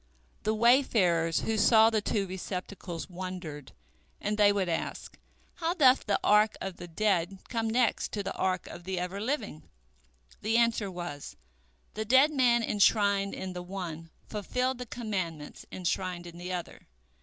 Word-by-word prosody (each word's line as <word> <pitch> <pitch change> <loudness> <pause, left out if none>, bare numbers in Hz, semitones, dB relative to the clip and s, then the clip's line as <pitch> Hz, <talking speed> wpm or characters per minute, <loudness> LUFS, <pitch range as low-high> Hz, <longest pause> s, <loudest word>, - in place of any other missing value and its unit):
The 215 +1 0
wayfarers 215 - +3
who 220 -1 -1
saw 220 +1 +6
the 215 -1 +1
two 205 -1 0
receptacles 185 -2 -6
wondered, 175 -6 -7 0.5
and 210 +1 -1
they 205 -1 +5
would 200 -2 0
ask, 165 - -4 0.4
"How 340 0 -1
doth 265 -8 +5
the 200 - +2
ark 210 +1 +4
of 190 -2 -5
the 175 - -8
dead 190 0 0
come 225 -1 -1
next 235 0 +1
to 205 - -2
the - - -3
ark 185 -1 -1
of 175 - -10
the 185 +1 -3
Ever 180 +3 -3
living?" 215 - -3 0.7
The 220 +2 +1
answer 230 -3 +2
was, 175 -6 -7 0.6
"The 215 - -3
dead 265 +7 +5
man 245 -4 +3
enshrined 200 -2 +2
in 185 -1 -5
the 180 - -5
one 175 -3 -6 0.2
fulfilled 250 +5 -2
the 250 - -6
commandments 185 -11 -5
enshrined 180 -1 -2
in 170 0 -10
the 180 +1 -5
other. 180 -2 -6
200 Hz, 155 wpm, -29 LUFS, 180-225 Hz, 0.7 s, saw